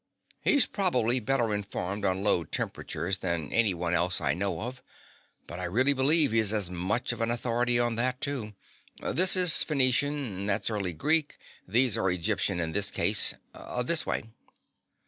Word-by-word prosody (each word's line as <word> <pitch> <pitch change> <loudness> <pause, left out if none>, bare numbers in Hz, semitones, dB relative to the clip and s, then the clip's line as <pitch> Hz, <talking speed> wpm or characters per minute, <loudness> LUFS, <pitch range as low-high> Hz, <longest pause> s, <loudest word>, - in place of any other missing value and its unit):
He's 285 - +3
probably 130 - +1
better 120 -2 -1
informed 100 0 -5
on 95 0 -1
low 95 -5 +1
temperatures 85 +4 -4
than 85 -5 -3
any 110 -5 +2
one 85 0 -3
else 90 +1 +1
I 70 -3 -1
know 90 -1 -3
of, 125 +3 -7 0.6
but 85 - -9
I 90 - -4
really 130 +11 +2
believe 140 +1 +4
he's 110 -2 +2
as 100 -5 0
much 95 +7 -2
of - - -7
an 115 - -1
authority 120 0 0
on 120 -1 -1
that, 125 +2 0
too. 125 -8 -4 0.4
This 185 +2 +3
is 180 -3 +6
Phoenician, 140 0 +2 0.2
and 100 +2 -4
that's 105 +3 0
early 100 -5 -3
Greek. 155 - -1 0.3
These 125 -1 +2
are 95 - 0
Egyptian 90 0 -2
in 80 -1 -3
this 100 +3 0
case. - - +4 0.5
This 160 +5 +1
way." - - -3
110 Hz, 165 wpm, -27 LUFS, 95-130 Hz, 0.6 s, is